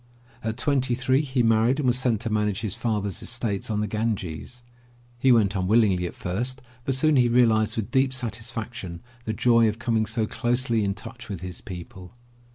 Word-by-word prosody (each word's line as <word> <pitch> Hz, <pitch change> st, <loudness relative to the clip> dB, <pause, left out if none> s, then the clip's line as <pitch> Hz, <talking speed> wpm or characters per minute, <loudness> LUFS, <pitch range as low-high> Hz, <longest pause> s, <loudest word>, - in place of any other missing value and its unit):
At 110 Hz, 0 st, -2 dB
twenty 130 Hz, -2 st, +1 dB
three 130 Hz, +2 st, +2 dB
he 130 Hz, -4 st, 0 dB
married 115 Hz, +3 st, +3 dB
and 145 Hz, -, 0 dB
was 125 Hz, -1 st, +4 dB
sent 120 Hz, -5 st, +1 dB
to 115 Hz, -, -2 dB
manage 105 Hz, -2 st, 0 dB
his 105 Hz, -5 st, -2 dB
father's 105 Hz, -4 st, -2 dB
estates 115 Hz, -5 st, -3 dB
on 105 Hz, -1 st, 0 dB
the 105 Hz, -, -1 dB
Ganges. 110 Hz, +1 st, -3 dB, 0.6 s
He 130 Hz, +1 st, +4 dB
went 105 Hz, -5 st, +4 dB
unwillingly 95 Hz, -2 st, +3 dB
at -, -, -9 dB
first, 125 Hz, +9 st, -2 dB, 0.2 s
but 135 Hz, -, 0 dB
soon 150 Hz, +2 st, +3 dB
he 120 Hz, -1 st, +4 dB
realized 115 Hz, -3 st, +3 dB
with 110 Hz, -3 st, -3 dB
deep 130 Hz, 0 st, +3 dB
satisfaction 115 Hz, -6 st, -4 dB, 0.2 s
the 110 Hz, -, -1 dB
joy 115 Hz, 0 st, +4 dB
of 105 Hz, -, -4 dB
coming 115 Hz, -3 st, 0 dB
so 110 Hz, 0 st, 0 dB
closely 120 Hz, 0 st, 0 dB
in 100 Hz, -1 st, -1 dB
touch 120 Hz, +1 st, -10 dB
with 95 Hz, -5 st, -5 dB
his 90 Hz, -1 st, -6 dB
people. 90 Hz, +1 st, -9 dB
115 Hz, 185 wpm, -25 LUFS, 105-125 Hz, 0.6 s, was